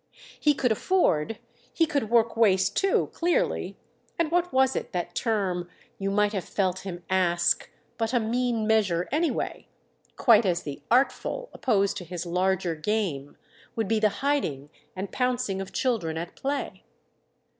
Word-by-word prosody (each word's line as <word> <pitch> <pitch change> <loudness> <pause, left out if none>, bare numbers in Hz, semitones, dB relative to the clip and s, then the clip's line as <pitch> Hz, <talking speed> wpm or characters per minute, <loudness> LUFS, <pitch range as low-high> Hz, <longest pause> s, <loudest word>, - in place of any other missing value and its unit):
He 295 -1 +3
could 250 -3 +1
afford, 220 - +1 0.3
he 330 - +2
could 280 -8 -1
work 230 -1 +3
waste 195 -4 +3
too, 390 -1 +2
clearly—and 350 -4 -2
what 355 +1 +1
was 265 0 +3
it, - - -4
that 175 -1 -3
term, 190 -6 -1 0.3
you 195 0 -1
might 210 +1 +2
have 190 -3 -2
felt 185 -2 -1
him 175 -3 -7
ask, 175 -2 +2 0.3
but 225 0 0
a 245 - +3
mean 235 0 0
measure, 200 -6 +2
anyway? 320 +3 -1 0.5
quite 230 -2 +5
as 175 -2 0
the 145 -1 -6
"artful," 275 - +1
opposed 200 -6 +1
to - - -5
his 175 0 -6
larger 180 0 0
game, 160 -5 -2 0.4
would 225 -3 -1
be 225 +1 +2
the 215 0 +4 0.2
hiding 150 - -1 0.2
and 190 +1 -5
pouncing 250 -6 -1
of 195 - -7
children 205 -11 -1
at 170 +1 -6
play. 280 +1 -3
210 Hz, 150 wpm, -26 LUFS, 180-250 Hz, 0.5 s, quite